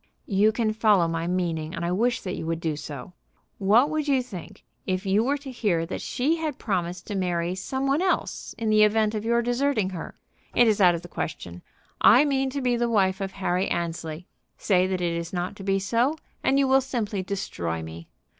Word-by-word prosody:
"You 205 +2 +3
can 220 -1 0
follow 210 -6 +3
my 165 0 -2
meaning, 170 -2 -2
and 170 - -3
I 170 - -1
wish 235 +6 +1
that 185 - -4
you 160 - -5
would 165 0 -1
do 160 -2 -2
so. 145 +1 -8 0.5
What 215 +7 +5
would 310 -1 -1
you 270 -3 +2
think 200 -9 -10 0.2
if 185 +1 -1
you 200 +3 +3
were 280 +4 +1
to 275 -2 -9
hear 195 -9 0
that 175 - -5
she 300 +7 0
had 310 -4 -3
promised 180 -4 -2
to 205 - -5
marry 175 -2 -1
some 265 +8 -3
one 275 +4 +2
else 375 - -1
in 220 -1 -1
the 215 0 +5
event 215 0 +3
of 215 -1 -3
your 235 +1 +2
deserting 245 -5 0
her? 175 -3 -7 0.4
It 240 - +6
is 215 -2 +2
out 175 -2 +6
of 170 - -6
the - - -8
question. 90 - -5 0.4
I 250 +8 +7
mean 270 -2 +1
to 280 +1 -3
be 250 -1 +1
the 240 0 0
wife 190 -4 +2
of 195 -1 -3
Harry 185 -1 0
Annesley. 165 -1 -3 0.3
Say 185 -2 +2
that 185 -1 -2
it 170 -1 0
is 170 +1 -4
not 180 0 -3
to 195 - -9
be 195 0 +1
so, 235 +9 +1 0.3
and 270 - +3
you 275 -1 +3
will 265 +1 +5
simply 225 -7 -2
destroy 85 - -3
me. 80 +1 -9
195 Hz, 220 wpm, -25 LUFS, 175-240 Hz, 0.5 s, I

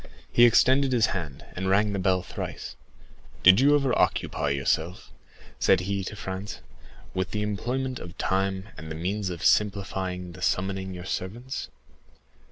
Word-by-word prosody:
He 120 - +7
extended 130 +3 +4
his 115 -3 +4
hand, 80 -8 -5
and 95 +1 -2
rang 100 +2 +3
the 100 - -1
bell 95 -1 +2
thrice. - - -6 0.7
"Did 95 +3 +8
you 145 +2 +5
ever 135 -4 +2
occupy 75 - +1
yourself," 80 +5 -1 0.5
said 95 - +4
he 100 +1 -2
to 105 - -6
Franz, 95 +1 -6 0.5
"with 95 -1 -1
the 105 -1 -2
employment 125 +5 -2
of 85 0 -10
time 95 +1 -1
and 80 - -8
the 80 - -5
means 95 +4 -2
of 85 -2 -5
simplifying 95 -3 +1
the 90 +1 -12
summoning 95 0 -1
your 90 0 -8
servants? 120 +9 -4
95 Hz, 155 wpm, -26 LUFS, 90-105 Hz, 0.7 s, Did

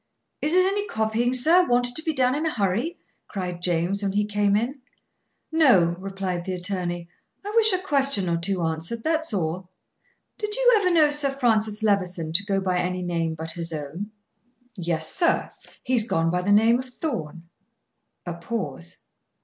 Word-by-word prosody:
"Is 305 +4 +1
it 370 0 +5
any 405 +2 -1
copying, 220 +2 0
sir, 320 +9 +5
wanted 245 0 +2
to - - +1
be 320 0 -1
done 255 -3 +2
in 305 +3 -1
a - - 0
hurry?" 225 - -1 0.3
cried 180 -3 -5
James, 175 +3 0
when 195 -1 -1
he 205 +1 +1
came 205 -1 +1
in. 250 +6 -2 0.7
"No," 205 - +4
replied 190 -2 -4
the 185 +1 -3
attorney. 175 -2 -3 0.4
"I 410 - -4
wish 445 -1 +6
a 370 - +2
question 275 - +1
or 170 -1 +1
two 180 +1 -1
answered, 165 +8 -3
that's 315 -2 0
all. 180 -1 -3 0.7
Did 425 0 -3
you - - +4
ever 390 -3 +2
know 315 -4 +4
Sir 295 -1 +2
Francis 220 -5 +1
Levison 180 -6 0
to 190 +4 +2
go 195 -1 0
by 185 -2 0
any 180 0 -1
name 165 -2 -2
but 160 +1 -4
his 170 0 -3
own?" 155 +6 -5 0.7
"Yes, 165 -4 -1
sir. 340 - +1 0.3
He 255 - -2
has 235 -3 +4
gone 165 -5 +1
by 180 +1 0
the 200 +3 0
name 225 +4 +5
of 260 - -5
Thorn." 170 - -5 0.8
A 175 - -4
pause. 165 - -6
200 Hz, 180 wpm, -24 LUFS, 175-265 Hz, 0.8 s, wish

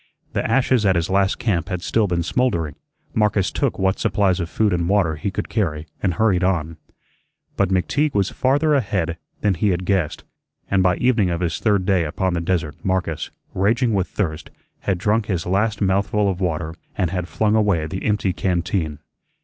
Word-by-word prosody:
The - - 0
ashes 130 -3 +3
at 95 -2 +3
his 85 +1 0
last 95 0 +2
camp 95 -6 -1
had 90 -2 -3
still 110 -2 +1
been 85 -2 0
smoldering. 85 - 0 0.4
Marcus 105 -3 +2
took 140 -4 -1
what 95 0 +1
supplies 95 -3 +2
of 85 -1 -3
food 105 0 +1
and 85 0 0
water 95 -6 +2
he 75 +7 -3
could 95 - -4
carry, 80 -8 -1 0.2
and 90 -4 0
hurried 95 -2 +2
on. 85 -4 0 0.8
But 100 -2 +1
McTeague 140 - +1
was 100 -1 +1
farther 145 +4 +2
ahead 95 - 0 0.2
than 105 -2 +2
he 100 +4 +1
had 90 0 -1
guessed, 95 -5 0 0.5
and 100 -1 +3
by 90 -1 +3
evening 115 -7 +2
of 85 0 -2
his 85 -2 -1
third 100 -4 +2
day 95 -3 +3
upon 95 +4 -1
the 85 - -1
desert 85 -4 -1
Marcus, 95 -4 -1 0.2
raging 115 +5 +2
with 95 -2 +1
thirst, 80 -6 -3 0.3
had 95 - -1
drunk 105 +4 +1
his 90 -5 -1
last 105 +4 0
mouthful 100 +1 +2
of 95 0 -6
water 80 -2 -1 0.2
and 90 -4 0
had 90 -2 -2
flung 105 +5 +1
away 100 -7 +2
the 95 +5 -5
empty 105 -3 +1
canteen. 90 -4 -1
95 Hz, 190 wpm, -21 LUFS, 85-105 Hz, 0.8 s, ashes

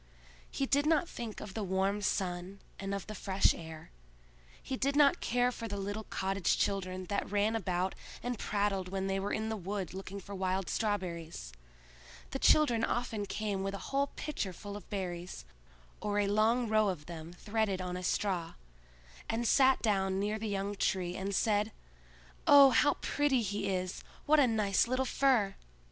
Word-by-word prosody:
He 275 - -1
did 285 +2 +2
not 320 +1 +3
think 230 -7 -6
of 200 - -7
the 220 - -3
warm 195 +2 0
sun 185 -1 -2 0.2
and 195 0 -2
of 200 - -5
the 215 - -7
fresh 195 -1 +2
air; 160 -1 -9 0.7
he 265 - -4
did 275 +2 0
not 295 +4 +5
care 245 +1 +2
for 230 -2 -6
the 200 -1 -4
little 205 +2 -4
cottage 195 -1 0
children 185 -2 -1
that 200 +2 -2
ran 210 +2 +1
about 185 -3 -1 0.3
and 245 -2 -3
prattled 200 -3 0
when 190 0 -2
they 195 0 0
were 200 +1 -2
in 220 0 -1
the 220 - -1
wood 195 -2 -4
looking 195 +1 -6
for 200 +1 -9
wild 190 -1 -1
strawberries. 170 - -3 0.8
The 270 - -3
children 245 -8 +4
often 225 -4 -1
came 205 -2 -2
with 195 +1 -2
a - - -8
whole 280 +1 +2
pitcher 220 -11 -3
full 205 +3 -8
of 205 - -10
berries, 180 - -5 0.6
or 205 0 -1
a 205 - +3
long 220 +4 +2
row 215 -1 +3
of 160 -6 -4
them 165 -1 -8
threaded 205 0 -1
on 180 -1 -3
a 180 - -4
straw, 180 -2 -1 0.7
and 230 +1 0
sat 265 +1 +4
down 195 -3 +1
near 210 +2 -1
the 220 - -3
young 200 0 -2
Tree 185 -2 -1
and 195 +1 -2
said, 210 0 +2 0.8
"Oh, 280 -2 +9
how 285 +5 +4
pretty 280 -4 +1
he 205 0 -2
is! 185 -1 -2 0.2
what 305 +1 +5
a 275 - +6
nice 210 -2 +2
little 255 +2 0
fir!" 245 -8 +2
200 Hz, 180 wpm, -32 LUFS, 190-225 Hz, 0.8 s, Oh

